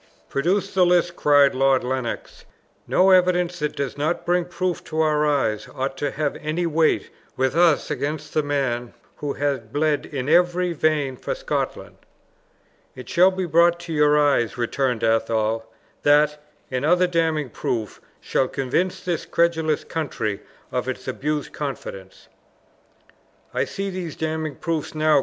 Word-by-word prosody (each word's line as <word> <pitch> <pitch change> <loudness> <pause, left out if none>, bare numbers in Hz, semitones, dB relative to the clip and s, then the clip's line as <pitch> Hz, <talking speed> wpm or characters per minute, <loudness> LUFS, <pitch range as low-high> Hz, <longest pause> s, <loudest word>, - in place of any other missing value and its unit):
"Produce 185 +8 0
the 190 -1 +4
list," 175 -1 +3
cried 145 -1 +4
Lord 135 0 +3
Lennox. 125 -2 -4 0.4
"No 190 +1 +4
evidence 180 -1 +3
that 150 0 -2
does 140 0 -4
not 155 +4 -1
bring 175 0 +2
proof 180 0 -3
to 160 0 -4
our 150 -1 +2
eyes 135 -8 0
ought 135 +1 -2
to 145 +1 -1
have 145 +1 -2
any 155 +3 -2
weight 160 -1 +1 0.3
with 130 +2 +1
us 170 -3 +3
against 150 +1 -3
the 155 - +2
man 135 -5 -2 0.2
who 145 -1 -3
had 135 -6 -2
bled 150 +1 0
in 135 -3 -4
every 175 +2 +3
vein 150 -4 0
for - - -3
Scotland." - - -3 1.0
"It - - -10
shall 180 +2 +5
be 190 -1 -3
brought 170 +1 +4
to 170 -1 -6
your 150 -1 +4
eyes," 140 -6 +2
returned 120 0 -1
Athol; 115 0 +1 0.3
"that, 150 +1 +3 0.3
and 130 +1 -2
other 180 +4 +4
damning 160 -6 0
proofs, 110 -2 -3 0.2
shall 130 - 0
convince 175 +10 -1
this 175 -3 -2
credulous 160 -3 +1
country 120 -10 -3 0.3
of - - -2
its - - -5
abused 150 0 -2
confidence." 100 -9 -7 1.3
"I - - +1
see 195 0 -4
these 180 -4 -5
damning 160 -2 -3
proofs 160 -1 -3
now!" 155 -1 +4
150 Hz, 150 wpm, -23 LUFS, 135-170 Hz, 1.3 s, shall